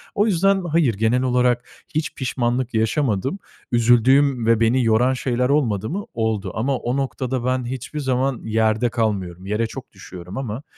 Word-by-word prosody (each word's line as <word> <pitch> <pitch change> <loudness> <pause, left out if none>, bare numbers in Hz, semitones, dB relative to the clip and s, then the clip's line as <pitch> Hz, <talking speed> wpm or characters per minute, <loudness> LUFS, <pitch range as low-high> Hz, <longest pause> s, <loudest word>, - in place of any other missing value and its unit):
O 205 - +3
yüzden 195 0 +2
hayır, 155 -7 +2
genel 110 +5 +1
olarak 125 -1 +1 0.3
hiç 155 0 -1
pişmanlık 125 -1 -1
yaşamadım. 115 - 0 0.3
Üzüldüğüm 120 +2 +4
ve 115 -1 +3
beni 120 +3 +3
yoran 120 +4 +3
şeyler 125 0 -1
olmadı 115 -8 +1
mı? 200 +6 -4
Oldu 110 -4 -1
ama 130 +4 0
o 120 +3 -2
noktada 130 -2 -2
ben 130 -1 0
hiçbir 130 +4 -5
zaman 130 -1 -1
yerde 110 +1 +1
kalmıyorum, 95 -6 -2
yere 105 +3 -1
çok 130 +2 -9
düşüyorum 95 0 -10
ama 130 +1 -4
125 Hz, 155 wpm, -21 LUFS, 110-135 Hz, 0.3 s, Üzüldüğüm